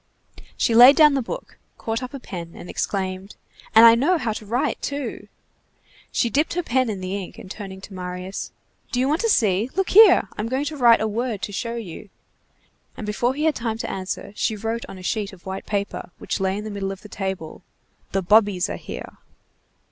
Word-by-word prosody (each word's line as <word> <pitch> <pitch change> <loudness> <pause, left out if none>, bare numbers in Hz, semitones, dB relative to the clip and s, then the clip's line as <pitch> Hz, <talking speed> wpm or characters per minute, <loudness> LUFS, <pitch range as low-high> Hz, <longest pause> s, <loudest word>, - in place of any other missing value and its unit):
She 235 - +2
laid 245 +5 +9
down 300 -2 +7
the 275 - +1
book, - - -7 0.2
caught 225 +2 -3
up 255 - -6
a 275 - -7
pen, 170 -8 -8
and - - -10
exclaimed:— 190 0 -3 0.4
"And 225 +1 +10
I 230 - +10
know 290 +10 +3
how 235 -7 -2
to 215 -1 -8
write, 240 +5 -1
too!" 285 -2 -4 0.8
She 240 - +1
dipped 295 +8 0
her 355 - 0
pen 255 -3 +1
in 200 -3 -4
the 185 +1 -3
ink, 195 -3 -6
and 190 - -10
turning 195 -3 -8
to 195 - -11
Marius:— 180 +1 -6 0.4
"Do 245 - 0
you 260 - +2
want 305 +4 +1
to 460 - +1
see? 215 - +2
Look 385 0 0
here, 400 - +8
I'm 210 - -1
going 265 +3 -1
to 305 - -4
write 240 -5 +5
a 220 - +1
word 225 -1 -3
to - - -3
show 230 +4 -3
you." 205 -3 -8 0.9
And 220 - -5
before 235 +5 0
he 300 - -2
had 315 -1 +3
time 230 -4 -3
to - - -4
answer, 190 +1 -5
she 220 - 0
wrote 225 +2 -3
on 195 - -9
a 185 - -11
sheet 205 +1 -2
of 180 - -16
white 190 0 -6
paper, 200 -3 -3
which - - -3
lay 190 0 0
in 210 - -5
the 215 - -6
middle 195 -1 -3
of 195 +1 -9
the - - -9
table: 190 -5 -5 0.5
"The 195 -1 0
bobbies 205 -1 +3
are - - -4
here." - - -8
220 Hz, 215 wpm, -23 LUFS, 195-255 Hz, 0.9 s, And